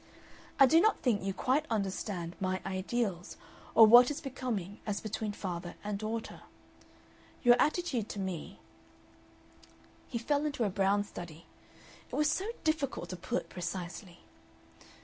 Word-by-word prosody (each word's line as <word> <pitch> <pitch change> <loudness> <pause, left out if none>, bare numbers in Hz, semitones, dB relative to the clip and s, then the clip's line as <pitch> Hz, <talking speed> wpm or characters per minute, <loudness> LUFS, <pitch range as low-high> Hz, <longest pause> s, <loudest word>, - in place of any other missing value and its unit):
I 275 - +10
do 325 +6 +5
not 435 +1 +3
think 230 -6 +1
you 195 +1 -2
quite 265 +10 0
understand 195 -4 -2
my 185 -1 -1
ideals 190 -1 -2 0.4
or 225 - +10
what 240 +3 +8
is 295 +1 -3
becoming 235 - -4
as 210 -2 -2
between 215 0 -3
father 175 -3 -5
and 205 -1 -3
daughter. 220 +1 -4 1.0
Your 240 -1 +7
attitude 300 - 0
to 205 - -5
me 190 -5 -5 0.8
" - - -27
He 240 - -1
fell 285 +5 0
into 285 -5 -2
a 205 - 0
brown 195 +2 +2
study. 170 -5 -10 0.7
It - - -4
was 300 0 +3
so 380 +6 -1 0.2
difficult 310 -4 -1
to 185 - -4
put 235 +8 -3
precisely. 180 0 -6
210 Hz, 145 wpm, -31 LUFS, 190-255 Hz, 1.0 s, I